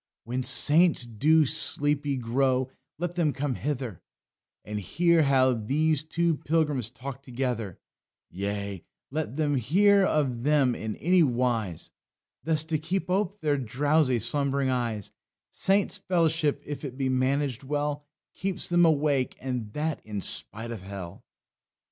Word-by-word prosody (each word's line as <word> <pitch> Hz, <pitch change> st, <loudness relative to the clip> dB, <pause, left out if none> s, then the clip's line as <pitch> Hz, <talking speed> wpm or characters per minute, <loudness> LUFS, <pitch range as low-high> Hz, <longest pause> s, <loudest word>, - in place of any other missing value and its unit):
"When 125 Hz, +3 st, -3 dB
Saints 155 Hz, +2 st, +3 dB
do 150 Hz, +8 st, +3 dB
sleepy 145 Hz, -1 st, 0 dB
grow, 130 Hz, +2 st, 0 dB, 0.3 s
let 175 Hz, +2 st, -3 dB
them 170 Hz, -4 st, +1 dB
come 140 Hz, -1 st, -2 dB
hither 125 Hz, -, -4 dB, 0.6 s
And 105 Hz, 0 st, -4 dB
hear 170 Hz, -, +2 dB
how 130 Hz, -3 st, +4 dB
these 140 Hz, +7 st, +1 dB
two 165 Hz, 0 st, 0 dB
pilgrims 150 Hz, -8 st, 0 dB
talk 130 Hz, +1 st, -8 dB
together; 120 Hz, -7 st, -3 dB, 0.5 s
Yea, 100 Hz, 0 st, -4 dB, 0.3 s
let 150 Hz, -4 st, -3 dB
them 145 Hz, -2 st, +1 dB
hear 195 Hz, -, +4 dB
of 135 Hz, -9 st, 0 dB
them, 140 Hz, -2 st, +3 dB
in 110 Hz, -2 st, -4 dB
any 180 Hz, +2 st, +3 dB
wise, 120 Hz, -, 0 dB, 0.5 s
Thus 155 Hz, -1 st, +2 dB
to 160 Hz, -1 st, -2 dB
keep 180 Hz, +4 st, -2 dB
ope 200 Hz, +1 st, -1 dB
their 145 Hz, -3 st, +1 dB
drowsy 140 Hz, +2 st, +1 dB
slumb'ring 135 Hz, +3 st, +1 dB
eyes; 115 Hz, -5 st, -2 dB, 0.4 s
Saints' 195 Hz, +1 st, +2 dB
fellowship, 165 Hz, -4 st, +1 dB
if 145 Hz, +1 st, -6 dB
it 130 Hz, -3 st, -6 dB
be 135 Hz, -1 st, 0 dB
managed 130 Hz, 0 st, 0 dB
well, 145 Hz, +1 st, -2 dB, 0.3 s
Keeps 190 Hz, -1 st, -2 dB
them 175 Hz, 0 st, +5 dB
awake, 145 Hz, -4 st, +1 dB
and 125 Hz, -5 st, -4 dB
that 155 Hz, 0 st, -2 dB
in 105 Hz, -1 st, -5 dB
spite 110 Hz, +5 st, -2 dB
of 110 Hz, -5 st, -6 dB
hell." 95 Hz, -3 st, -8 dB
140 Hz, 135 wpm, -27 LUFS, 120-155 Hz, 0.6 s, them